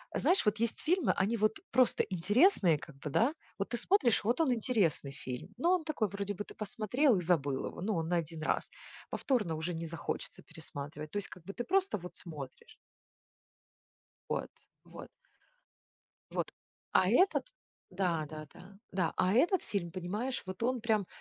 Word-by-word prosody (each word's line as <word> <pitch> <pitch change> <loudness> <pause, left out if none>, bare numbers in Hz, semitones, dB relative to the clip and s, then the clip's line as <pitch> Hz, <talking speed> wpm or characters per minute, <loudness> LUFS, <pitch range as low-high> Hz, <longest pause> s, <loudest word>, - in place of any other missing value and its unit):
Знаешь, 370 - +3
вот 210 0 +3
есть 230 0 0
фильмы, 360 +4 +3
они 210 +5 +1
вот 215 0 +2
просто 255 0 +4
интересные, 190 - +4
как 150 -2 -11
бы 145 +2 -5
да. 235 - +3 0.3
Вот 195 - -1
ты 240 - 0
смотришь, 245 - +3
вот 240 +8 +2
он 280 -6 +3
интересный 210 - +1
фильм. 130 +1 -6
Ну, 335 +8 +2
он 365 -3 +3
такой 260 -10 0
вроде 200 +1 -3
бы 205 - -4
ты - - -11
посмотрел 225 +4 +2
и - - 0
забыл 145 -6 +1
его, - - -7
ну, 210 +3 0
он 165 -1 -1
на 175 - +3
1 160 -1 -3
раз. - - 0 0.4
Повторно 215 - 0
уже 160 +3 -3
не 165 0 -4
захочется 160 -2 -4
пересматривать. 150 -1 -6
То - - -2
есть 205 - -2
как 180 - -11
бы 195 - -6
ты 240 - -3
просто 385 - +2
вот 180 +1 -9
смотришь. 145 -6 -9 1.5
Вот, - - -2 0.3
вот. - - -10 1.2
Вот. - - -2 0.4
А - - +5
этот 380 +1 +4 0.4
да, 175 -4 0
да, 155 0 -8
да. 195 +2 -14 0.2
Да, 180 -4 +1
а 185 +2 +3
этот 350 - +4
фильм 170 -5 -3
понимаешь, 205 +8 -2
вот 185 +3 -6
он 250 0 +1
прям, 215 -4 +1
195 Hz, 175 wpm, -33 LUFS, 165-240 Hz, 1.5 s, А